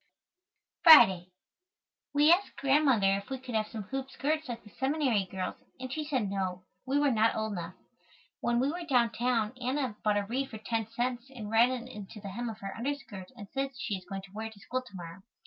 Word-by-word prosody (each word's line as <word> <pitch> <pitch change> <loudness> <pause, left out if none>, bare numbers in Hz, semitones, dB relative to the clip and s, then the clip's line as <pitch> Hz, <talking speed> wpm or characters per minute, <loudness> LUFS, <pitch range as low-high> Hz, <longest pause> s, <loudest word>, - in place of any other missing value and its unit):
Friday. 190 - +9 0.8
We 295 +2 +5
asked 390 +3 -1
Grandmother 265 -9 +3
if 200 - -8
we 265 - -3
could 255 -1 -9
have 215 -1 +1
some 220 -2 -6
hoop 270 +5 -5
skirts 310 +2 -2
like 235 -1 -5
the 210 - -15
seminary 265 - +1
girls 185 0 -4 0.2
and 260 0 -5
she 310 - -2
said 265 -8 -1
no, 185 -2 -3 0.2
we 275 +2 +2
were 290 -1 +3
not 225 -1 +3
old 220 0 -1
enough. 175 -2 -5 0.6
When 240 0 +1
we 270 +3 +2
were 350 +2 -5
downtown 240 -4 +1
Anna 255 -2 -1
bought 210 -1 +2
a 205 - +1
reed 260 +6 -2
for 220 - -7
10 225 0 -2
cents 240 +2 -3
and 225 -6 -8
ran 230 +2 +6
it 250 -1 -4
into 210 -3 -9
the 200 -1 -7
hem 235 +5 -4
of 220 - -8
her 195 0 -5
underskirt 240 -7 -5
and 205 - -9
says 270 -1 -3
she 215 - -2
is 185 -2 -5
going 195 -1 -5
to 195 - -14
wear 220 +1 -4
it 220 - -10
to 205 - -17
school 255 +5 -3
to 250 -6 -15
morrow. 170 +1 -8
235 Hz, 215 wpm, -30 LUFS, 205-270 Hz, 0.8 s, Friday